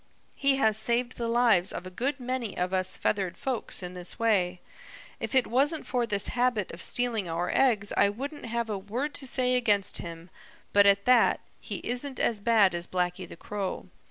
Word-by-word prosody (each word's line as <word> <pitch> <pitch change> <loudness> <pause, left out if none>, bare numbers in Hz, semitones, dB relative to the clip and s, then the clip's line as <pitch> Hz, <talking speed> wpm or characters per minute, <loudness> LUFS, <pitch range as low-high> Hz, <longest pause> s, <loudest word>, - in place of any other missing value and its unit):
He 275 -1 +2
has 220 -5 +2
saved 240 +3 0
the 235 - -2
lives 230 -6 +4
of - - -6
a 185 - -8
good 270 +9 -2
many 250 -4 -3
of 180 +1 -1
us 185 0 +1
feathered 190 -4 -1
folks 250 -7 -3
in 180 0 -6
this 180 -1 -4
way. 190 -6 +1 0.6
If - - -4
it 260 - +5
wasn't 285 +7 +1
for 245 -2 -1
this 200 -3 +1
habit 240 -5 0
of 170 - -9
stealing 230 -6 -1
our 170 +2 -1
eggs 215 -6 +2
I 200 - +4
wouldn't 275 +6 -6
have 235 0 -2
a 210 -3 -3
word 245 +10 -3
to 270 - -7
say 255 0 +1
against 205 -6 +1
him, 170 +1 -9 0.4
but 205 0 +6
at 200 0 +4
that, 250 -1 +4 0.2
he - - -6
isn't 255 +3 -2
as 220 -3 +1
bad 210 -4 +4
as 175 0 0
Blacky 180 0 -2
the - - -10
Crow. 200 0 -5
220 Hz, 195 wpm, -28 LUFS, 185-250 Hz, 0.6 s, but